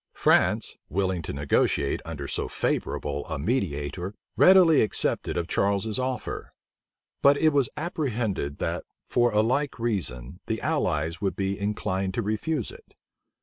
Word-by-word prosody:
France, - - +2
willing 95 +1 0
to - - -5
negotiate 70 0 +1
under 75 -4 -5
so - - -2
favorable 70 0 -2
a 80 - -3
mediator, 85 - -2 0.2
readily 180 -5 +7
accepted 105 - 0
of 85 -1 -1
Charles's 100 +4 0
offer; 130 0 -3 0.7
but 140 +1 +6
it 160 - +4
was 140 -5 +2
apprehended 120 - -2
that, - - -2 0.2
for 120 -1 +3
a 105 0 +3
like 135 +5 0
reason, 90 - -3
the 110 0 -1
allies 85 - 0
would 100 -2 0
be 95 0 -2
inclined 95 -2 -1
to 120 - 0
refuse 110 +5 -1
it. - - -16
100 Hz, 140 wpm, -26 LUFS, 80-125 Hz, 0.7 s, readily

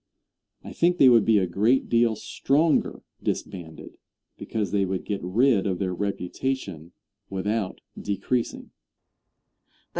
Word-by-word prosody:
I - - -9
think 175 +1 +2
they 135 -6 +7
would 115 -3 +5
be 110 -2 +4
a 95 - +2
great 105 +9 +2
deal 115 -1 +3
stronger 145 +8 0 0.2
disbanded, 85 -4 -5 0.4
because 110 -2 -3
they 100 -1 +2
would 95 -1 -3
get 100 -2 -3
rid 105 +3 +2
of 95 -2 -1
their 95 -1 -2
reputation 95 - -4 0.4
without 100 +1 -2
decreasing. 115 +4 -3
105 Hz, 120 wpm, -25 LUFS, 95-120 Hz, 0.4 s, they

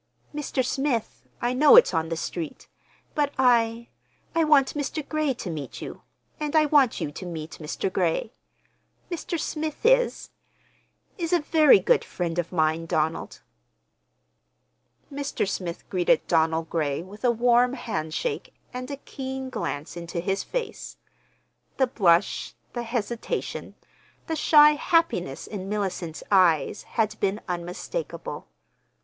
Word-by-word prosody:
"Mr. 290 -3 -1
Smith, 270 -4 -2 0.2
I 240 +1 +1
know 290 +8 +7
it's 485 - +7
on 160 -1 0
the 165 - -2
street, 165 -1 -5 0.5
but 290 -1 +1
I—I 235 +5 0
want 295 -3 +4
Mr. 295 0 -3
Gray 305 -4 0
to 185 -6 -5
meet 145 -5 -6
you, - - -8 0.4
and 300 0 -2
I 310 -1 +6
want 285 -5 +4
you 145 - -3
to 165 - -8
meet 160 -2 -7
Mr. 160 +5 -3
Gray. 180 +5 0 0.8
Mr. 340 0 -3
Smith 310 +5 -4
is—is - - +3 1.0
a 350 - +5
very 305 -3 +6
good 185 - +2
friend 175 -1 -3
of 175 - -2
mine, 160 -1 +1
Donald." 160 0 -1 1.7
Mr. 280 -7 -2
Smith 180 -3 -4
greeted 180 -2 +2
Donald 160 0 +1
Gray 150 -2 -1
with 205 +5 -13
a 245 - +4
warm 240 +1 +3
handshake 230 - -3 0.2
and 255 +1 -5
a 280 - -4
keen 265 -1 -6
glance 155 - -4
into 170 0 -5
his 195 +3 -1
face. 470 -4 -5 0.8
The 265 - +4
blush, 185 -9 +2 0.2
the 240 - -3
hesitation, 235 -1 -3 0.5
the 320 - -2
shy 300 -1 +7
happiness 300 - 0
in 195 -2 -6
Mellicent's 190 -6 -3
eyes 185 -1 +4 0.2
had 215 -1 +1
been 200 +1 0
unmistakable. 180 - -5
230 Hz, 130 wpm, -25 LUFS, 170-285 Hz, 1.7 s, know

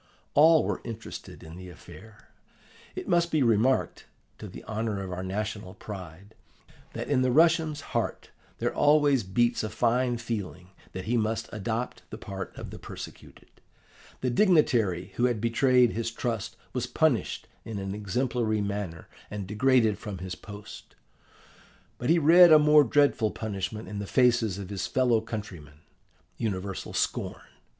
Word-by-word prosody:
All 160 +1 +6
were - - -2
interested 115 -1 -8
in 80 +2 -10
the 90 0 -9
affair. 105 +6 -14 0.7
It - - -6
must 170 -1 +2
be 155 -4 +2
remarked, 115 +3 +1 0.3
to - - -7
the - - -10
honour 110 -1 -3
of 95 - -6
our 90 0 -4
national 100 0 -4
pride, 95 0 -9 0.6
that - - -5
in 135 -3 +2
the 130 - +2
Russian's 160 +1 +3
heart - - -2 0.3
there - - -1
always 145 -3 +4
beats 120 +5 +1
a 110 - -3
fine 120 +2 +1
feeling 100 -6 -5 0.2
that 95 0 -6
he 120 +2 +1
must 110 0 -1
adopt 110 +3 -3
the - - -7
part 95 -1 -6
of - - -7
the - - -9
persecuted. - - -11 0.6
The 125 - 0
dignitary 120 - +2
who 120 - +3
had 120 -3 +1
betrayed 125 +1 +3
his 115 0 -2
trust 115 -2 -3 0.2
was 125 -1 -2
punished 155 -8 0 0.2
in 110 -2 -6
an 95 0 -4
exemplary 110 +1 -1
manner 100 -5 -4 0.2
and 105 -2 -5
degraded 110 0 +2
from 105 -3 -6
his 90 0 -6
post. 105 +2 -11 1.0
But 125 - -2
he 170 - +5
read 170 +2 +7
a 155 - +10
more 150 0 +6
dreadful 140 -4 +3
punishment 105 0 -5
in 105 -1 -5
the 100 - -5
faces 120 -6 +2
of 100 -1 -7
his 95 -2 -3
fellow 125 -4 +2
countrymen: 90 -10 -8 0.6
universal 100 -3 -3
scorn. - - -2
110 Hz, 155 wpm, -27 LUFS, 100-130 Hz, 1.0 s, a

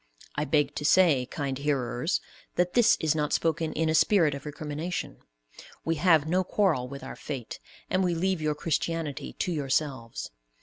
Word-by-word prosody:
I 150 - 0
beg 145 0 +2
to - - -3
say, 150 -6 +4
kind 140 -2 -3
hearers, 140 +1 0 0.3
that 180 0 +1
this 235 -2 +5
is 160 -1 +2
not 150 -1 -1
spoken 165 0 +1
in 160 +1 0
a 155 - +2
spirit 160 -2 +4
of 140 +1 -7
recrimination. 150 +4 -4 0.7
We 165 0 0
have 160 -3 +4
no 180 +3 +2
quarrel 180 -10 +1
with 140 +1 -8
our - - -7
fate, 135 -6 -6 0.3
and 185 +1 +1
we 175 -2 +1
leave 185 0 0
your 155 -1 0
Christianity 165 -1 -2
to 180 - -2
yourselves. 135 -5 -2
155 Hz, 170 wpm, -28 LUFS, 140-170 Hz, 0.7 s, this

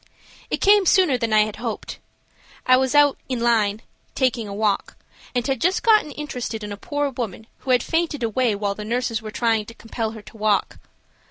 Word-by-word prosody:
It - - -2
came 405 -2 +5
sooner 360 -8 +4
than 230 -2 -2
I 215 0 +5
had 210 0 -2
hoped. 230 -1 -5 0.7
I 255 - +6
was 260 +2 +1
out 290 -1 +5
"in 255 -2 -1
line" 225 -3 +1 0.3
taking 245 -4 0
a - - -7
walk, 205 0 -1 0.4
and 245 -1 0
had 265 -3 -1
just 365 +3 +1
gotten 430 -8 +4
interested 250 -7 -5
in 210 - -6
a - - -4
poor 290 +6 -2
woman 225 -4 -5
who - - -10
had 250 -2 +4
fainted 325 -5 -1
away 230 0 +1
while 200 0 -1
the 210 - -7
nurses 230 0 -1
were 220 - -7
trying 220 -1 0
to 230 - -11
compel 225 -1 -4
her 220 -2 -10
to 220 - -14
walk. 210 -1 0
235 Hz, 200 wpm, -22 LUFS, 215-265 Hz, 0.7 s, I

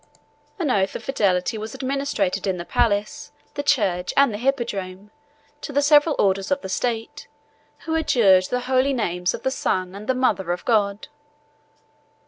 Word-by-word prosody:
An 325 -8 0
oath 195 -4 +1
of - - -6
fidelity 200 -5 0
was 215 +1 -7
administered 270 -9 -2
in 190 -1 0
the 170 - -6
palace, 210 +7 -1 0.2
the - - -3
church, 200 -11 0
and 275 -5 +4
the 205 - -5
hippodrome, 210 -7 -3 0.5
to - - -6
the 285 +1 +1
several 295 +1 +5
orders 195 +1 +1
of 280 0 0
the 190 - -7
state, 230 +2 -3 0.5
who 320 - -4
adjured 220 -12 +4
the 250 +5 -2
holy 260 +2 +1
names 180 -7 -1
of - - -11
the 265 - 0
Son, 185 -7 -2
and 210 +5 -3
mother 225 -8 0
of 175 0 -4
God. 205 -3 +1
220 Hz, 160 wpm, -22 LUFS, 190-270 Hz, 0.5 s, several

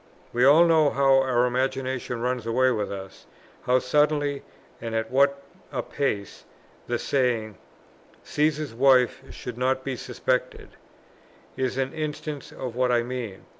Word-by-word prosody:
We 120 +1 +3
all 155 +5 +7
know 160 -3 +4
how 135 -1 +4
our 125 -2 +2
imagination 130 -1 -2
runs 125 -2 -2
away 130 +3 +3
with 105 -4 -2
us, 95 -1 -9 0.4
how 125 0 +5
suddenly 145 +2 +1 0.4
and 115 -1 -4
at 110 +1 -2
what 140 +1 +3 0.3
a 125 -4 -2
pace; 105 -9 -3 0.4
the - - 0
saying, 120 -6 0 0.7
"Cæsar's 150 -2 0
wife 125 0 +4
should 125 -1 -8
not 130 +1 +1
be 135 -1 -3
suspected," 125 +1 -2 0.9
is 130 -1 -2
an 135 +1 -1
instance 150 -2 -5
of 125 -3 -6
what 125 0 +1
I 120 -1 +2
mean. 120 -5 -6
130 Hz, 140 wpm, -25 LUFS, 120-140 Hz, 0.9 s, all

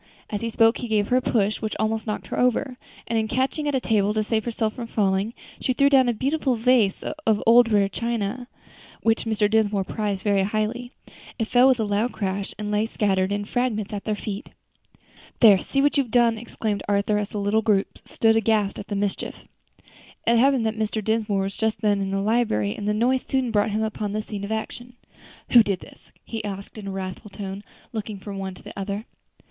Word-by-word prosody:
As 205 - -2
he 230 - -2
spoke 225 +1 +3
he 245 - -4
gave 210 -2 +1
her 250 - +4
a - - +2
push, 215 -4 0
which 215 -1 -3
almost 220 +1 -1
knocked 210 - -3
her - - -3
over, 250 +1 +1 0.3
and 230 - +1
in 220 - -1
catching 265 +5 -1
at 290 - 0
a - - +2
table 210 -3 +1
to 215 - +1
save 220 0 -1
herself 220 -2 -1
from 235 -2 -6
falling, 200 +1 0 0.2
she 255 - 0
threw 280 +2 +3
down 260 -3 +5
a - - +2
beautiful 270 +2 0
vase 230 -4 +2
of 265 -9 0
rare - - -6
old 235 +1 +6 0.2
china, 235 +1 -3 0.6
which 225 0 +2
Mr. 215 -2 +2
Dinsmore 210 -2 +2
prized 205 -1 -3
very 200 -2 +2
highly. 215 +5 -2 0.5
It 225 - -1
fell 250 +1 +6
with 260 -2 +4
a - - +2
loud 210 +4 0
crash, 195 -1 -3
and 210 0 -4
lay 210 +1 +1
scattered 195 -3 0
in 205 0 -1
fragments 220 -3 -1
at 205 - -5
their 215 - 0
feet. 205 0 -6 0.9
"There, 210 -5 +7
see 275 +7 0
what 290 0 +3
you've 265 -4 0
done!" 235 0 +4
exclaimed 220 -2 -3
Arthur, 205 +1 +2
as 205 0 -3
the - - -6
little 205 +2 +1
group 205 -3 0
stood 225 -1 +2
aghast 220 -2 +1
at 200 - -8
the 205 - -3
mischief. 200 0 -3 0.8
It 235 0 +4
happened 265 -2 +3
that 220 0 -2
Mr. 215 0 -1
Dinsmore 215 -2 0
was 195 +1 -4
just 220 -1 -1
then 205 -2 +2
in 195 - -2
the 195 0 -1
library, 200 - +1
and 205 - -5
the 210 - +2
noise 250 +4 +2
soon 260 -3 0
brought 210 0 +2
him 215 +1 -1
upon 210 -1 -3
the 215 0 -2
scene 205 -2 -6
of 200 - -5
action. 240 +3 -5 0.6
"Who 240 - +9
did 200 -5 -1
this?" - - -16
he 225 -2 -5
asked, 200 +1 -6
in 200 - -8
a - - -3
wrathful 190 +2 -6
tone, 200 0 -7 0.3
looking 215 -2 -4
from 195 0 -7
one 190 -1 -5
to - - -16
the - - -9
other. 200 +2 -4
215 Hz, 220 wpm, -24 LUFS, 205-235 Hz, 0.9 s, Who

